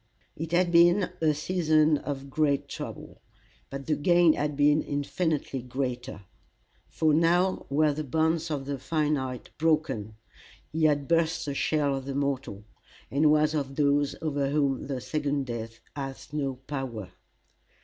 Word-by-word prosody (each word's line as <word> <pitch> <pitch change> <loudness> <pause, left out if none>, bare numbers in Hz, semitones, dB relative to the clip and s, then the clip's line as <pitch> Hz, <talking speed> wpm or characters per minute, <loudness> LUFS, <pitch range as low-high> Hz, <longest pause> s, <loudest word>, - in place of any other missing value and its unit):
It 165 +1 -5
had 175 0 +2
been 175 +3 +5
a 155 -1 +4
season 155 -2 +2
of 140 -1 -6
great 145 -1 +1
trouble, - - -8 0.5
but 135 0 -6
the 155 - +1
gain 175 +1 +4
had 150 -1 -2
been 145 +1 +4
infinitely 145 -1 -2
greater; 125 -4 -4 0.6
for 155 -1 +1
now 175 +4 +2
were 150 +2 +3
the 155 +2 -3
bonds 160 +3 0
of 145 -3 -3
the 140 -1 -4
finite 145 -4 -2
broken, 140 -10 0 0.6
he 160 0 +1
had 145 -2 +2
burst 165 -1 +1
the 140 - -3
shell 145 0 +1
of 135 -1 -5
the 135 0 -4
mortal, 135 -7 -2 0.5
and 150 +3 +4
was 150 0 +3
of 140 -3 -2
those 145 -1 +2
over 145 -3 0
whom 140 -3 0
the 135 -2 -3
second 145 -2 -1
death 115 -2 -6
hath 135 0 -7
no 140 -3 -1
power. 130 -7 -6
145 Hz, 150 wpm, -27 LUFS, 135-155 Hz, 0.6 s, been